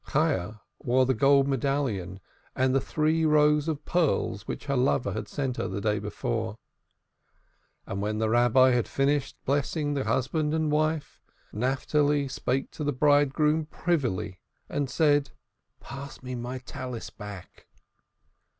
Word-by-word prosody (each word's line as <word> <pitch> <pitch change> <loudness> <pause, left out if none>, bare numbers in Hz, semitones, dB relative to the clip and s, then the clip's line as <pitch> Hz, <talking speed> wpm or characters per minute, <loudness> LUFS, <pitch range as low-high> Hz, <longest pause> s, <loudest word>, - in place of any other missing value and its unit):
Chayah 110 - 0 0.2
wore 130 +1 +2
the 130 - +2
gold 140 +3 +4
medallion 130 -9 -1 0.4
and 130 0 +2
the 135 - +3
three 155 +3 +1
rows 150 -1 +4
of 155 -2 -3
pearls 155 - 0
which - - -5
her 140 -1 -1
lover 125 -1 +1
had - - -4
sent 135 -3 -3
her - - -1
the 95 +2 -4
day 105 0 0
before. 105 -11 -3 1.3
And 100 - -4
when 105 +1 -1
the 110 0 +1
Rabbi 120 +3 +5
had 120 -2 +1
finished 140 0 0
blessing 145 +2 0
husband 135 +5 0
and 160 -1 0
wife, 155 0 -1 0.3
Naphtali 140 +4 +1
spake 130 +1 -2
the 145 -2 -2
bridegroom 150 +2 +3
privily, 115 - -2 0.3
and 145 -2 -2
said: 145 -2 +2 0.5
"Pass 135 0 -9
me 125 0 -5
my 125 +1 -4
Talith 125 -2 -7
back." 100 -3 -10
135 Hz, 135 wpm, -27 LUFS, 120-150 Hz, 1.3 s, Rabbi